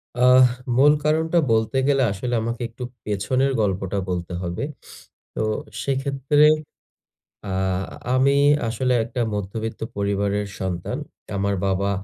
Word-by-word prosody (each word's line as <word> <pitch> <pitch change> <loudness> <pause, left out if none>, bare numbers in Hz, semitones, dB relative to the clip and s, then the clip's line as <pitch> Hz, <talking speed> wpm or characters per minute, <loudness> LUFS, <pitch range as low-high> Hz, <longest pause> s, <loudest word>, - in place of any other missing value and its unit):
আহ 125 +1 +6 0.3
মূল 145 +3 +7
কারণটা 160 +2 +2
বলতে 110 +4 +1
গেলে, 135 -2 +3
আসলে 120 +5 -3
আমাকে 115 +2 -3
একটু 115 +2 -9 0.2
পেছনের 130 +7 0
গল্পটা 95 -1 -1
বলতে 90 -1 -3
হবে। 90 +6 -3 0.7
তো - - -1 0.4
সেক্ষেত্রে 140 +2 +2 1.0
আ 95 - -2 0.6
আমি 140 +2 +4 0.3
আসলে 125 +3 0
একটা 120 +1 -5
মধ্যবিত্ত 110 +3 -4 0.2
পরিবারের 100 0 0
সন্তান। 90 -2 -3 0.4
আমার 100 0 0
বাবা 95 +1 0
115 Hz, 115 wpm, -23 LUFS, 100-135 Hz, 1.0 s, মূল